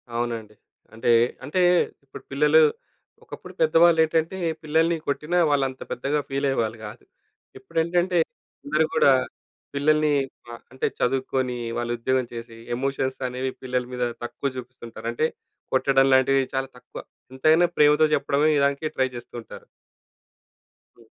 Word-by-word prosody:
అవునండి. 115 Hz, -3 st, -3 dB, 0.4 s
అంటే, 115 Hz, +2 st, -2 dB, 0.3 s
అంటే 150 Hz, +7 st, -2 dB, 0.5 s
ఇప్పుడు 135 Hz, -, -12 dB
పిల్లలు 150 Hz, +3 st, +4 dB, 0.6 s
ఒకప్పుడు -, -, -11 dB
పెద్దవాళ్ళేంటంటే 160 Hz, +1 st, +4 dB, 0.3 s
పిల్లల్ని 160 Hz, +2 st, +2 dB
కొట్టినా, 150 Hz, +5 st, -1 dB
వాళ్ళు 145 Hz, -2 st, +2 dB
అంత 130 Hz, -, -13 dB
పెద్దగా 140 Hz, +4 st, -1 dB
ఫీలయ్యేవాళ్ళు 135 Hz, -5 st, -1 dB
కాదు. 105 Hz, -, -10 dB, 0.6 s
ఇప్పుడేంటంటే, 170 Hz, +5 st, 0 dB, 0.5 s
అందరూ 155 Hz, +2 st, +2 dB
గూడా 140 Hz, -, +5 dB, 0.6 s
పిల్లల్ని 150 Hz, +1 st, +2 dB, 0.6 s
అంటే 130 Hz, -, -1 dB
చదువుకొని, 130 Hz, 0 st, -1 dB, 0.2 s
వాళ్ళు 120 Hz, 0 st, -2 dB
ఉద్యోగం 130 Hz, +1 st, 0 dB
చేసి 115 Hz, 0 st, -8 dB, 0.2 s
ఎమోషన్స్ 135 Hz, 0 st, -2 dB
అనేవి 130 Hz, +1 st, -3 dB
పిల్లల 125 Hz, -1 st, -1 dB
మీద 125 Hz, -, -2 dB, 0.2 s
తక్కువ 140 Hz, +3 st, -3 dB
చూపిస్తుంటారు. 120 Hz, -3 st, -9 dB
అంటే 155 Hz, +7 st, 0 dB, 0.5 s
కొట్టడం 135 Hz, +1 st, +3 dB
లాంటివి 135 Hz, +1 st, +4 dB
చాలా 135 Hz, 0 st, -1 dB
తక్కువ -, -, -11 dB, 0.3 s
ఎంతైనా 155 Hz, +6 st, +4 dB
ప్రేమతో 150 Hz, +1 st, +5 dB
చెప్పడమే 145 Hz, +2 st, +1 dB
ఇదానికి 140 Hz, +2 st, +1 dB
ట్రై 130 Hz, -, +2 dB
చేస్తూ 120 Hz, -, -10 dB
ఉంటారు. 485 Hz, -1 st, -12 dB, 1.3 s
హ్మ్. -, -, -20 dB
135 Hz, 120 wpm, -24 LUFS, 125-155 Hz, 1.3 s, గూడా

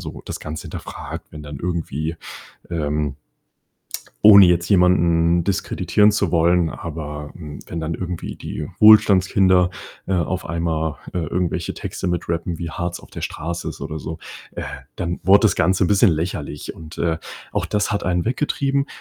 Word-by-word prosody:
so -, -, -8 dB
das -, -, -6 dB
Ganze 75 Hz, 0 st, -6 dB
hinterfragt, -, -, -7 dB
wenn 75 Hz, -1 st, -9 dB
dann 75 Hz, -2 st, -8 dB
irgendwie, 80 Hz, -2 st, -3 dB, 0.5 s
ähm 75 Hz, -3 st, -1 dB, 1.1 s
ohne 100 Hz, -3 st, +10 dB
jetzt 90 Hz, +1 st, +2 dB
jemanden 85 Hz, -2 st, +4 dB
diskreditieren 105 Hz, +1 st, +2 dB
zu 100 Hz, -4 st, 0 dB
wollen, 85 Hz, 0 st, +3 dB
aber, 75 Hz, -3 st, -6 dB
hm, 75 Hz, -4 st, -8 dB
wenn 85 Hz, -, -5 dB
dann 80 Hz, 0 st, -3 dB
irgendwie 90 Hz, 0 st, -5 dB
die 75 Hz, -, -5 dB
Wohlstandskinder, 95 Hz, -4 st, +6 dB, 0.4 s
äh, 95 Hz, -, 0 dB
auf 90 Hz, +1 st, -1 dB
einmal, 80 Hz, -2 st, -1 dB, 0.2 s
äh, 90 Hz, -, -2 dB
irgendwelche 85 Hz, +2 st, -2 dB
Texte -, -, -5 dB
mit 90 Hz, 0 st, -1 dB
rappen, 85 Hz, 0 st, -2 dB
wie 85 Hz, -1 st, -4 dB
hart 85 Hz, +3 st, -3 dB
es -, -, -6 dB
auf -, -, -17 dB
der -, -, -8 dB
Straße 85 Hz, +2 st, -4 dB
ist, -, -, -8 dB
oder 80 Hz, -, -4 dB
so, 80 Hz, +3 st, -6 dB, 0.4 s
äh, -, -, -5 dB, 0.3 s
dann 85 Hz, 0 st, -3 dB
wurde 95 Hz, +3 st, +7 dB
das 110 Hz, -, +3 dB
Ganze 95 Hz, +3 st, +3 dB
'n -, -, 0 dB
bisschen 100 Hz, +2 st, +5 dB
lächerlich 80 Hz, -3 st, -3 dB
und, 80 Hz, -1 st, -11 dB
äh, 80 Hz, -1 st, 0 dB, 0.3 s
auch -, -, -1 dB
das 105 Hz, 0 st, 0 dB
hat 100 Hz, -, -1 dB
einen 90 Hz, -1 st, 0 dB
weggetrieben, 140 Hz, +2 st, 0 dB
85 Hz, 165 wpm, -21 LUFS, 80-95 Hz, 1.1 s, ohne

